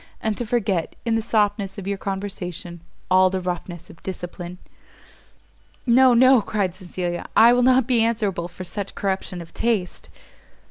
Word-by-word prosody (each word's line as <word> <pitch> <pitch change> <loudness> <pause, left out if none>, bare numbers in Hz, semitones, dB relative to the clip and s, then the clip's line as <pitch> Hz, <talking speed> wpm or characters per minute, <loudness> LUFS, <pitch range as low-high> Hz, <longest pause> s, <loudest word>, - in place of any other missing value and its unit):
and 220 -1 -1
to 240 - -4
forget, 205 -8 -1
in 230 - +1
the 225 - +1
softness 205 -3 0
of 195 - -6
your 200 0 -1
conversation, 185 -3 -5 0.3
all 185 0 +6
the 190 0 -2
roughness 175 -1 -5
of - - -16
discipline!" 180 -1 -7 1.3
"No, 255 0 +5
no," 255 0 +6
cried 200 -3 -1
Cecilia, 175 -2 -5
"I 230 +2 +8
will 245 - +3
not 255 0 +4
be 245 -2 +3
answerable 210 -7 0
for 180 +1 -9
such 200 +2 -5
corruption 190 -2 -3
of 165 - -18
taste!" 220 -6 -2
195 Hz, 155 wpm, -23 LUFS, 180-230 Hz, 1.3 s, I